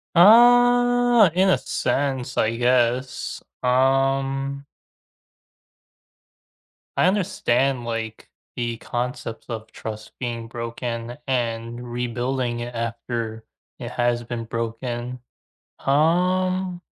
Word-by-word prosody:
Uh, 245 +2 +6
in 185 +2 +3
a - - +4
sense, 130 0 -2
I 115 +1 +1
guess. 125 +1 +1 0.2
Um 135 +2 +1 2.3
I - - +4
understand, 135 - +1
like, 115 -1 -5 0.3
the 120 -1 -2
concept 120 -1 -4
of 110 -2 -6
trust 110 -1 -7
being 115 -2 -4
broken 115 +1 -5
and 120 -1 -2
rebuilding 120 0 -2
it 120 0 -6
after 115 -1 -4 0.3
it 120 -1 -6
has 120 -1 0
been 115 0 -5
broken. 120 +2 -4 0.6
Um 180 +5 +1
125 Hz, 90 wpm, -23 LUFS, 115-140 Hz, 2.3 s, Uh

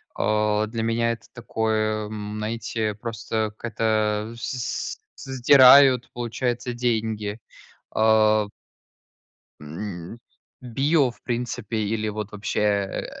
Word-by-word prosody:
а, 105 0 +1
для 115 +1 -4
меня 115 +1 +1
это 115 - -7
такое, 110 -2 -1
м, 105 0 -6
знаете, 110 -1 -3
просто, 110 -1 -3
как-то 110 -1 -1
с 125 +1 -4 0.2
с - - -12
сдирают, 130 0 +7
получается, 120 +1 -2
деньги, 110 -3 -1 0.6
а. 110 -1 +4 1.1
М, 90 +6 -7 0.4
"Био", 135 +2 +1
в - - -23
принципе, 120 -3 -3
или, 110 +1 -1
вот 105 0 -5
вообще, 105 0 -3
э 100 -2 0
110 Hz, 105 wpm, -24 LUFS, 105-120 Hz, 1.1 s, сдирают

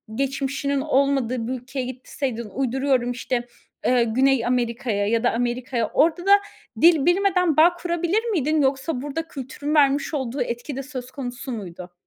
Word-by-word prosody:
geçmişinin 275 +1 -1
olmadığı 270 -5 +1
bir 255 - -2
ülkeye 260 +1 -5
gitseydin, 250 -2 -5
uyduruyorum, 260 0 0
işte, 245 0 -3 0.4
eee, 250 -1 +4
Güney 255 +2 +2
Amerika’ya 235 -4 0
ya 230 +2 +1
da 245 - +3
Amerika’ya. 240 -1 -1
Orada 335 +3 +2
da 400 +1 +7 0.4
dil 325 -4 +6
bilmeden 360 -3 +2
bağ 340 +3 +6
kurabilir 345 +4 -1
miydin 315 - +1
yoksa 265 0 0
burada 300 +3 -4
kültürün 285 +1 -4
vermiş 285 0 +3
olduğu 265 -2 -2
etki 240 +4 -4
de 270 - -4
söz 260 -2 -7
konusu 260 0 -6
muydu? 180 -5 -7
265 Hz, 150 wpm, -23 LUFS, 245-295 Hz, 0.4 s, da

